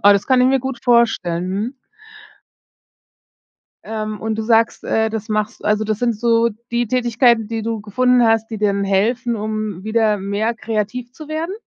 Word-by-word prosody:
Oh, 205 0 +8
das 200 0 0
kann 260 -1 +4
ich 250 - +5
mir 265 -1 +2
gut 265 0 -5
vorstellen, 225 -8 +2
mhm. 220 +8 -3 2.1
Ähm, 215 -1 -4
und 220 0 -2
du 220 - -2
sagst, 225 0 +2
äh, 220 0 +1
das 220 -1 -5
machst 215 0 -3
also 210 +1 +2
das 215 -1 -1
sind 240 -2 +1
so 230 +1 +2 0.2
die 240 0 0
Tätigkeiten, 235 -1 +2
die 225 -1 -4
du 225 -1 -3
gefunden 250 +4 +2
hast, 225 0 +2
die 220 - -4
dir 210 - +2
dann 200 0 0
helfen, 230 +5 +1
um 215 -3 -4
wieder 220 -1 +1
mehr 205 +4 -1
kreativ 225 +2 -3
zu 305 +3 -11
werden? 320 +4 -3
225 Hz, 180 wpm, -19 LUFS, 210-240 Hz, 2.1 s, Oh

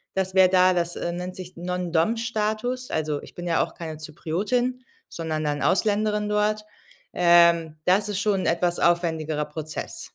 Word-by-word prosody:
das 190 -1 -1
wäre 185 -1 +6
da 185 0 +5
das, 175 -1 -1
äh, 170 - -3
nennt 180 +1 -5
sich 185 -1 -9
Non-Dom-Status. 215 +7 -1
Also 155 -2 -1
ich - - -13
bin 175 0 -6
ja 165 - +2
auch - - -8
keine 160 -2 -6
Zypriotin, 210 +12 -2 0.3
sondern 160 -2 -3
dann 145 0 -1
Ausländerin 210 +2 +1
dort. 210 0 0 0.5
Ähm, 170 -2 +4
das 195 +3 +3
ist 200 -1 -2
schon 200 -2 +1
'n - - -3
etwas 175 +1 +1
aufwendigerer 160 -3 +1
Prozess. 155 +1 -6
180 Hz, 160 wpm, -24 LUFS, 165-210 Hz, 0.5 s, wäre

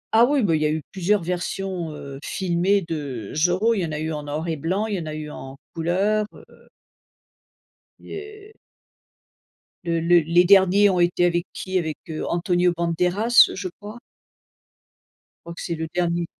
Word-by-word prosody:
Ah 230 +2 +7
oui, 275 0 +1
bah, 170 -5 +2
il 155 - -1
y - - +2
a - - 0
eu 155 -1 -2
plusieurs 195 +1 +1
versions, 180 0 -3
heu, 140 -2 -9
filmées 190 +2 0
de 140 -10 -5
Zorro. 180 +8 +2
Il 220 - -1
y 180 - 0
en - - -6
a 150 - -3
eu 160 +1 -3
en 150 - -4
noir 150 +3 -4
et 160 -1 -2
blanc, 185 +8 -1
il 220 - -3
y - - -2
en 160 - -6
a 155 - -5
eu 155 -1 -6
en 135 -1 -9 0.2
couleurs, 195 +6 0
heu - - -18 1.3
il - - -19
y - - -5
heu 425 +1 -11 1.3
Le 170 -1 0
le 170 +1 +5
les 170 +3 +3
derniers 195 +2 +6
ont 185 -2 +1
été 175 0 +2
avec 175 0 +1
qui? 185 0 -3
Avec, 160 -4 -2
heu, 155 - -4
Antonio 175 0 +1
Banderas, 180 +7 +3
je 190 0 -4
crois. 210 +3 -9 1.5
Je - - -10
crois - - -9
que - - -8
c'est 170 - -3
le 160 0 -4
dernier. 175 -1 0
175 Hz, 195 wpm, -23 LUFS, 160-195 Hz, 1.5 s, Ah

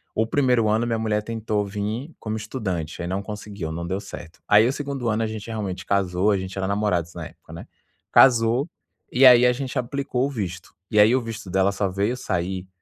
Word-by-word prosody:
O 110 - +2
primeiro 125 -3 +2
ano, 110 +3 +1
minha 115 -1 0
mulher 105 -1 0
tentou 110 -2 -2
vir 110 +9 -4
como 110 0 -4
estudante, 95 - -4
aí, 85 - -3
não 95 +2 -2
conseguiu, 105 -5 -6
não 85 +1 -4
deu 95 +3 -2
certo. 85 -3 -10
Aí, 105 +2 +6
o 130 - 0
segundo 140 -4 -4
ano, 110 +1 0
a - - 0
gente 110 0 -7
realmente 100 -4 -4
casou 100 0 +1
a 100 - +2
gente 95 +1 -6
era 95 0 -1
namorados 100 -5 0
na - - -6
época, - - -18
né? - - -9 0.4
Casou, 120 +2 +5 0.4
e 125 - +2
aí, 125 -1 +8
a 125 - +4
gente 135 +1 -5
aplicou 130 +1 -1
o - - -2
visto. 95 -8 -5 0.2
E 105 - +2
aí, 110 +4 +6
o 130 - +1
visto 115 -4 -7
dela 95 +2 +2
só 100 0 -1
veio 100 +6 -1
sair, 95 -4 -3
105 Hz, 215 wpm, -23 LUFS, 95-120 Hz, 0.4 s, aí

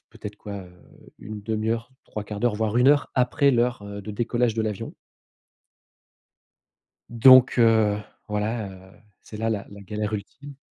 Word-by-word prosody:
peut-être, 105 0 -9
quoi, 100 -2 -8 0.5
1/2 110 +1 -4
heure, 115 +2 -3
3/4 105 -1 -6
d'heure, 120 -3 +1
voire 110 +1 -1
1 125 +2 +5
heure 145 0 +3
après 140 +3 +3
l'heure, 120 -2 +1
heu, 100 0 -8
de 105 - -7
décollage 120 +2 0
de 115 - -1
l'avion. 105 -3 -4 2.2
Donc, 130 +2 +7
heu, 110 -3 +4 0.3
voilà, 105 0 -2
heu, 95 +1 -14 0.2
c'est 105 - -10
là, 115 +1 -1
la 105 -3 -2 0.2
galère 105 0 -3
ultime. 135 +7 -7
110 Hz, 140 wpm, -24 LUFS, 105-120 Hz, 2.2 s, Donc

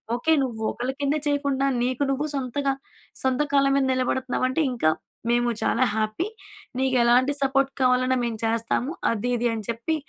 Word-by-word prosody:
Okay. 245 +7 0
నువ్వు 230 -4 -4
ఒకళ్ళ 250 +2 -3
కింద 285 +1 +1
చేయకుండా 280 -2 0 0.2
నీకు 255 +2 0
నువ్వు 280 +3 -1
సొంతగా 275 +1 -1 0.5
సొంత 260 +1 +1
కాళ్ళ 275 -1 +4
మీద 270 - +2
నిలబడుతున్నావంటే 255 +2 0
ఇంకా 155 -10 +2 0.4
మేము 240 0 +2
చాలా 255 - +2
హ్యాపీ. 215 +10 -1 0.5
నీకు 265 -1 +1
ఎలాంటి 250 +4 +4
సపోర్ట్ 275 0 +2
కావాలన్నా 255 0 +3
మేము 230 -2 -3
చేస్తాము. 230 +4 0 0.2
అది 230 +2 -2
ఇది 240 +1 +1
అని 220 -1 -4
చెప్పి 235 +8 -1
255 Hz, 155 wpm, -24 LUFS, 240-275 Hz, 0.5 s, కాళ్ళ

